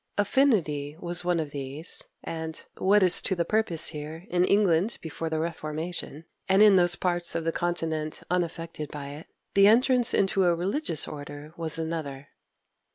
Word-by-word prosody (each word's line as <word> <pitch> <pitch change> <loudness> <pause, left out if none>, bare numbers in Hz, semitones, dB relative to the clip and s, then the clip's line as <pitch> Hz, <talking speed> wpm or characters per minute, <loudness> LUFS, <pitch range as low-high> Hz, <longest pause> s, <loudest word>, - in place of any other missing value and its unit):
Affinity 185 - +1
was 175 0 -3
one 175 -1 +1
of 155 -3 -3
these; 140 +4 -4 0.2
and 160 -1 -5 0.2
what 200 +1 +4
is 180 -1 +3
to 190 - -1
the 170 -1 0
purpose 215 -7 0
here, 155 +2 -7
in 175 0 +3
England 200 +1 +2
before 160 0 -5
the 160 - -1
Reformation, 160 -1 -4 0.2
and 195 +2 +6
in 210 -2 +7
those 175 -1 +5
parts 175 -1 0
of 165 - -1
the 165 - 0
continent 160 -3 -3
unaffected 165 -3 -3
by 140 -2 -7
it 145 +3 -10 0.3
the 200 0 +6
entrance 245 +2 +4
into 195 -1 +2
a 175 -1 +3
religious 185 - 0
order 145 +1 -8
was 165 -2 -1
another. 155 -4 -5
165 Hz, 160 wpm, -27 LUFS, 155-185 Hz, 0.3 s, in